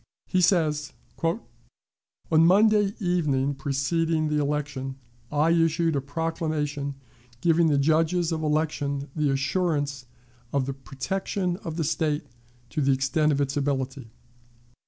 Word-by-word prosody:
He 185 Hz, -, +1 dB
says: 155 Hz, -5 st, +2 dB, 0.3 s
"On 165 Hz, +7 st, +1 dB, 0.9 s
Monday 200 Hz, +5 st, +5 dB
evening 150 Hz, -8 st, +1 dB
preceding 155 Hz, +4 st, 0 dB
the 150 Hz, 0 st, +1 dB
election 145 Hz, -2 st, -2 dB, 0.4 s
I 150 Hz, +3 st, +3 dB
issued 165 Hz, -1 st, +2 dB
a 140 Hz, -, 0 dB
proclamation 150 Hz, -1 st, -2 dB, 0.4 s
giving 165 Hz, +1 st, +3 dB
the 145 Hz, -2 st, +3 dB
judges 160 Hz, +4 st, +2 dB
of 160 Hz, -1 st, -1 dB
election 150 Hz, -2 st, -1 dB
the 150 Hz, -2 st, +1 dB
assurance 140 Hz, -2 st, -1 dB, 0.4 s
of 140 Hz, -2 st, +1 dB
the 135 Hz, -, -3 dB
protection 180 Hz, +7 st, -3 dB
of 165 Hz, -4 st, -6 dB
the 165 Hz, -, 0 dB
State 150 Hz, 0 st, 0 dB, 0.5 s
to 150 Hz, -, -1 dB
the 135 Hz, 0 st, +3 dB
extent 150 Hz, +4 st, +1 dB
of 140 Hz, -, 0 dB
its 140 Hz, 0 st, -1 dB
ability. 135 Hz, -3 st, -2 dB
150 Hz, 125 wpm, -26 LUFS, 140-165 Hz, 0.9 s, Monday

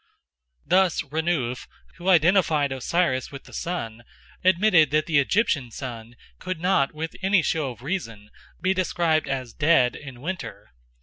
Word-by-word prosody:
Thus 185 Hz, -2 st, +2 dB
Renouf, 145 Hz, -4 st, -2 dB, 0.3 s
who 180 Hz, +2 st, -2 dB
identified 165 Hz, -4 st, +3 dB
Osiris 135 Hz, 0 st, 0 dB
with 140 Hz, -1 st, -9 dB
the -, -, -16 dB
sun, 120 Hz, -10 st, -4 dB, 0.4 s
admitted 180 Hz, -4 st, +4 dB
that 155 Hz, +2 st, +1 dB
the 155 Hz, -3 st, +3 dB
Egyptian 140 Hz, -, +1 dB
sun 120 Hz, -1 st, -8 dB, 0.2 s
could 185 Hz, -3 st, -4 dB
not 180 Hz, -6 st, +2 dB
with 160 Hz, +1 st, -6 dB
any 190 Hz, -2 st, +3 dB
show 155 Hz, -4 st, 0 dB
of 120 Hz, -1 st, -11 dB
reason 115 Hz, -, -5 dB, 0.3 s
be 185 Hz, +2 st, +1 dB
described 170 Hz, -4 st, 0 dB
as 130 Hz, -4 st, -4 dB
dead 145 Hz, -5 st, +3 dB
in 135 Hz, -4 st, -10 dB
winter. 135 Hz, -, -6 dB
155 Hz, 140 wpm, -24 LUFS, 130-180 Hz, 0.4 s, admitted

